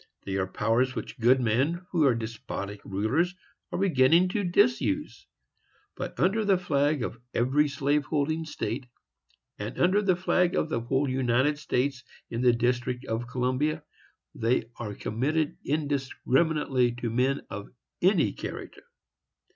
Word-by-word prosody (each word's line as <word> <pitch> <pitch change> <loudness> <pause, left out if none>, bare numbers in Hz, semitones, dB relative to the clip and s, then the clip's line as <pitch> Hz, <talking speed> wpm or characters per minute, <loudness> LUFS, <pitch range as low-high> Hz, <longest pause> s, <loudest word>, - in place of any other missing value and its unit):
They 95 - -3
are 95 -1 0
powers 115 +6 +1
which - - -6
good 125 +3 +5
men 135 +10 0
who 165 -5 +3
are 125 - +3
despotic 110 -3 -5
rulers 125 - 0 0.4
are - - -2
beginning 170 -1 +4
to 205 +2 -1
disuse; 240 +10 +1 0.7
but, - - -6
under 215 +4 +2
the 200 -2 +3
flag 145 -5 +1
of 120 - -5 0.2
every 135 +5 +3
slave 145 +1 0
holding 155 +3 0
state, 125 -3 -4 0.7
and 105 +4 -5
under 185 +4 +4
the 190 -3 +3
flag 180 0 +1
of 155 - 0
the 115 - 0
whole 135 +4 0
United 130 +3 +1
States 135 -2 -1 0.3
in 115 - -2
the 125 -1 +6
District 120 +1 -1
of 115 +2 -3
Columbia, 130 +5 -1 0.5
they 115 0 0
are 105 -4 -5
committed 145 +10 -1
indiscriminately 140 -2 +1
to 120 -1 -4
men 130 +4 +1
of 100 0 -6 0.3
any 175 - +3
character. - - -7
135 Hz, 140 wpm, -27 LUFS, 120-160 Hz, 0.7 s, the